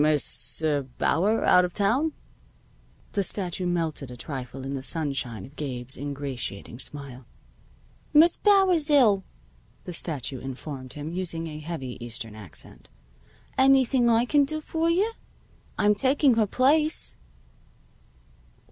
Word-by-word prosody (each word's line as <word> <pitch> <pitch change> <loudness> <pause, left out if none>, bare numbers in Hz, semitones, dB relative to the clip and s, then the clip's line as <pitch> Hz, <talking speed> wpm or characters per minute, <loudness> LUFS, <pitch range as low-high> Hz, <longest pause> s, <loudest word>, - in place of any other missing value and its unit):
"Miss 155 +1 0
er 150 -2 +2 0.2
Bauer 200 +9 +2
out 180 - +6
of 180 -1 -3
town?" 250 +10 +2 1.0
The 200 - 0
statue 185 -2 -2
melted 160 -6 -2
a 125 - -9
trifle 130 0 -6
in 135 - -4
the 135 - -3
sunshine 135 - -2
of 135 - -16
Gabe's 130 -4 -3
ingratiating 135 -6 -5
smile. 135 -4 -4 0.8
"Miss 320 +3 +6
Bauer's 380 -7 +4
ill," 225 -10 +5 0.6
the 180 - -6
statue 140 -6 -1
informed 130 0 -7
him, 150 +3 -6
using 170 -2 -3
a 155 -2 -6
heavy 140 -7 -6
Eastern 115 -2 -5
accent. 90 - -9 0.7
"Anything 265 -2 +4
I 230 +1 +4
can 290 +3 +4
do 310 +3 -3
for 325 +2 -1
you? 390 +7 +2 0.7
I'm 210 0 +4
taking 265 +5 +3
her 220 -2 +2
place." 300 +8 +2
165 Hz, 130 wpm, -26 LUFS, -, 1.0 s, out